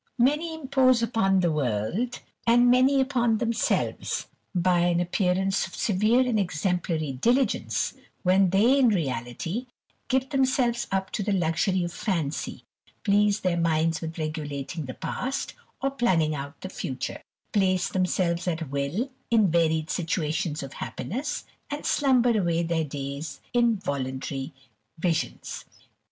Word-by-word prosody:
Many 300 +7 +2
impose 260 -5 +3
upon 195 -5 +2
the 170 -2 +2
world, 150 - -1 0.3
and 240 +1 +6
many 260 +2 +5
upon 245 -4 +2
themselves, 230 0 0 0.3
by 180 0 +3
an 175 0 +2
appearance 185 +2 +1
of - - -11
severe 215 +5 +3
and 245 -4 +1
exemplary 170 -3 -1
diligence, 240 - +1 0.3
when 190 0 +4
they, 225 +9 +4
in 260 - +5
reality, 165 - -2 0.4
give 265 0 0
themselves 255 -3 +1
up 190 -1 -1
to - - -2
the 205 +1 -1
luxury 180 +1 +1
of 175 0 -4
fancy, 165 -8 -3 0.4
please 205 0 +3
their 175 -2 +1
minds 165 -1 +1
with 165 0 -5
regulating 155 -1 -4
the 130 - -7
past, 270 +2 -3 0.3
or 275 - +2
planning 180 - +2
out 140 +1 -6
the 190 - -5
future; 130 -7 -4 0.3
place 185 -3 +2
themselves 180 -1 0
at 160 -5 -2
will 145 - -1 0.2
in 220 -6 +4
varied 160 -1 +2
situations 160 -2 -1
of 135 - -8
happiness, 265 +9 -4 0.2
and 290 +1 -5
slumber 250 -4 +3
away 170 -2 +1
their 165 -1 0
days 140 0 -5
in 235 -2 +4
voluntary 135 -5 -3 0.5
visions. 165 -1 -2
185 Hz, 135 wpm, -26 LUFS, 160-235 Hz, 0.5 s, and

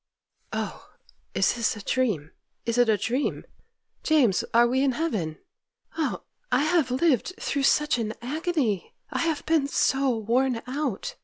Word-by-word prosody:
'Oh, - - -5 0.4
is - - +3
this 230 -2 0
a - - -8
dream!—is 230 - -2
it 245 -2 +5
a 215 - +4
dream! 250 +7 -1 0.6
James, 260 - +3
are 235 +1 +6
we 255 +2 +1
in 270 -2 +2
heaven? 215 - -2 0.6
Oh, 320 -2 -2 0.3
I - - +3
have 310 -3 +2
lived 270 - +1
through 280 - -1
such 300 -4 +2
an 220 -1 -2
agony—I 275 - -2
have 325 -3 -1
been 315 -4 +2
so 275 -1 +2
worn 235 +2 +1
out! 260 -4 -3
255 Hz, 140 wpm, -26 LUFS, 230-300 Hz, 0.6 s, are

